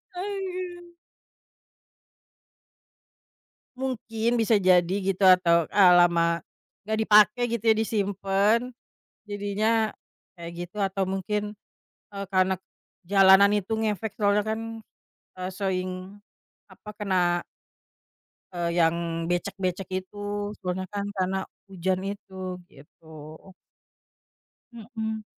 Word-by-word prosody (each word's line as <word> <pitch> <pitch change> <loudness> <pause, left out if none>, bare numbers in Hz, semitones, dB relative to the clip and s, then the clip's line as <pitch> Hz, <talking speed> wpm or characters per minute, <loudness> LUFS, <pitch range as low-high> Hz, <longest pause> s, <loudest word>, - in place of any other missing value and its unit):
Aduh. 365 -2 -5 2.9
Mungkin 235 -3 -2
bisa 225 -1 +3
jadi 180 -1 +3 0.2
gitu 190 +1 -4
atau, 170 -3 +5
eee, 190 -3 +6
lama, 170 -1 +3 0.5
gak 220 0 0
dipake 215 +1 +5
gitu 235 -2 -2
ya 220 - +6
disimpan 205 0 +1 0.7
jadinya 210 +2 0 0.5
kayak 170 0 -7 0.2
gitu 195 - -21
atau 195 -1 0
mungkin, 210 +2 -2 0.6
eee, 200 0 -5
karena 185 0 +3 0.5
jalanan 195 +1 +6
itu 210 +1 -1
ngefek 215 -1 -2
soalnya 205 0 +2
kan, 220 +1 -2 0.8
eee, 185 0 -4
sering 185 0 -4 0.5
apa, 210 - -13
kena 180 -4 +1 1.1
eee, 170 -1 -2
yang 165 +1 +3 0.3
becek-becek 185 0 -2
itu 205 +2 -18 0.4
sebenernya 185 0 -4
kan 200 0 -2
karena 190 0 -1 0.3
hujan 185 0 -1
itu 190 -3 -7
gitu. 150 +3 -20 1.7
Mhm. 220 -1 -5
200 Hz, 95 wpm, -26 LUFS, 185-220 Hz, 2.9 s, eee